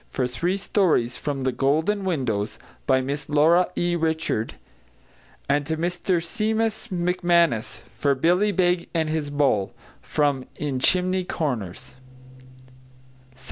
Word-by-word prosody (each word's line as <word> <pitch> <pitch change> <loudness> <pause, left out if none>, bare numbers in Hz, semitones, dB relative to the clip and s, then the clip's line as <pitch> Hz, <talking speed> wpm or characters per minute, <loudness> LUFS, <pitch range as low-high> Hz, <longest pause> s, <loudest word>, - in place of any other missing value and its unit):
for 125 - -1
three 175 +10 -1
stories 175 - +1
from 140 -3 -3
The 130 - +1
Golden 160 +11 +1
Windows, 125 - -1 0.3
by 130 -1 +4
Miss 140 +3 -4
Laura 160 +5 +4
E. 175 0 +1
Richards; 160 -9 -1 0.9
and 145 +1 +2
to 160 - -1
Mr 175 +2 0
Seumas 220 +3 -1
McManus 175 - +1
for 140 +4 +1
Billy 180 +9 +2
Beg 180 -2 +1
and 160 -1 +1
his 155 -2 -2
Bull, 140 -9 +1 0.3
from 140 -3 0
In 140 -3 -3
Chimney 185 +5 +2
Corners. 125 - -4 1.4
S.C. 130 - -23
160 Hz, 125 wpm, -24 LUFS, 135-180 Hz, 1.4 s, by